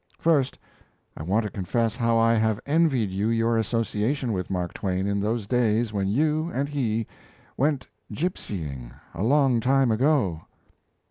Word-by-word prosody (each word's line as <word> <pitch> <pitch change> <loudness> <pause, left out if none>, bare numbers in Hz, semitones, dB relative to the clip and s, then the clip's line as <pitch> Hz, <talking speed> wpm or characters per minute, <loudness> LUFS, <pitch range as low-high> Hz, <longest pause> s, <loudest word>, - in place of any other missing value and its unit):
First, 150 -6 +2 0.6
I - - -8
want 100 +8 +1
to 105 - -4
confess 115 +4 -1
how 115 -2 +1
I 115 0 +4
have 110 -1 +1
envied 140 - +2
you 100 +3 -1
your 115 0 +2
association 115 +3 -1
with 90 -2 -3
Mark 90 -3 -2
Twain 95 -1 -2
in 100 0 0
those 110 +1 -1
days 115 -1 +1
when 100 -2 0
you 155 - +1
and 140 +2 0
he 115 -6 -1 0.5
"went 140 -1 0 0.2
gipsying, 75 - -4 0.2
a 85 - -6
long 130 +1 +3
time 130 +1 +3
ago." 110 - +2
115 Hz, 150 wpm, -25 LUFS, 100-135 Hz, 0.6 s, I